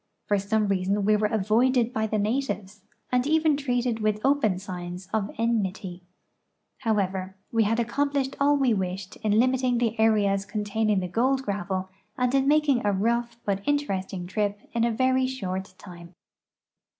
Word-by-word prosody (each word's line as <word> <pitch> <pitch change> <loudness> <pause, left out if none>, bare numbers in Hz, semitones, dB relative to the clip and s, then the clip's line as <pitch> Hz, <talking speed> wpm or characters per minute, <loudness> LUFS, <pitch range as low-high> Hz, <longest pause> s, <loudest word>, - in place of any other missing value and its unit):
For 205 -1 +1
some 210 +2 0
reason 195 +1 0
we 215 +1 +4
were 210 0 +2
avoided 230 +4 +2
by 220 0 0
the 215 - -1
natives, 210 -3 -2 0.3
and 250 +1 +2
even 315 -1 +3
treated 245 -4 -1
with 215 -1 0
o)>en 270 -9 +2
signs 180 -1 -7
of 220 -2 +1
enmit3^ 200 -5 -1 0.8
Plowever, 190 -4 -1 0.2
we 225 -2 +3
had 225 +2 +1
accom 255 +5 0
plished 275 -1 -1
all 285 +1 +4
we 265 -4 +3
wished 190 0 -4
in 215 -1 +1
limiting 255 0 +2
the 230 -1 -1
areas 205 -3 +3
containing 210 -2 -1
gold 260 +5 +1
gravel 190 -3 -3 0.3
and 250 0 +1
in 270 0 +2
making 295 -4 +3
a 205 - +2
rough 235 +4 0
but 200 -1 0
interesting 195 -11 -1
trip 205 +2 -1
in 230 - +1
a 235 - +1
very 260 +2 +2
short 190 -7 -5
time. 170 -2 -12
215 Hz, 160 wpm, -26 LUFS, 195-250 Hz, 0.8 s, we